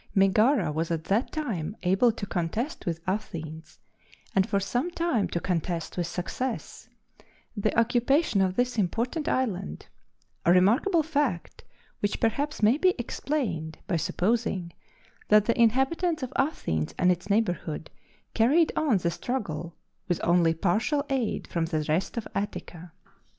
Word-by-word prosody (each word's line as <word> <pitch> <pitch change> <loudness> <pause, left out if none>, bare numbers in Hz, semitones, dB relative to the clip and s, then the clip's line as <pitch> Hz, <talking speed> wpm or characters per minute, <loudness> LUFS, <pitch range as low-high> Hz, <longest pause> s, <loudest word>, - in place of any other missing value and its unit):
Megara 210 - +4
was 160 +2 -2
at 165 -2 -2
that 210 +9 0
time 215 - -3
able 195 +6 +4
to 215 - -6
contest 200 - -3
with 170 -1 -2
Athens, 160 -5 -5 0.6
and 190 0 +3
for 200 -1 +2
some 245 - -1
time 335 - 0
to 170 - -2
contest 170 -1 -2
with 175 -2 -1
success, 225 +9 -4 0.7
the 215 +1 +1
occupation 245 - +2
of 185 -1 +1
this 245 -2 0
important 235 - -1
island 200 - -2 0.6
a 170 - +4
remarkable 235 - +4
fact, 285 - -2 0.4
which 205 0 -1
perhaps 280 +4 -1
may 230 +8 +5
be 370 +1 +4
explained 225 - -3
by 190 - -1
supposing 185 0 0 0.5
that 210 -1 +5
the 235 0 +2
inhabitants 270 +7 +2
of 255 - -5
Athens 80 - -1
and 180 0 +4
its 180 +3 -3
neighborhood 175 -7 -1 0.4
carried 290 +9 +4
on 280 -9 +3
the 170 -2 0
struggle 175 - -4 0.3
with 175 - 0
only 170 -1 +3
partial 220 - +1
aid 255 -5 -1
from 170 -2 -1
the 155 -2 -2
rest 165 +9 0
of 230 - -3
Attica. 180 -4 -5
205 Hz, 140 wpm, -27 LUFS, 170-250 Hz, 0.7 s, may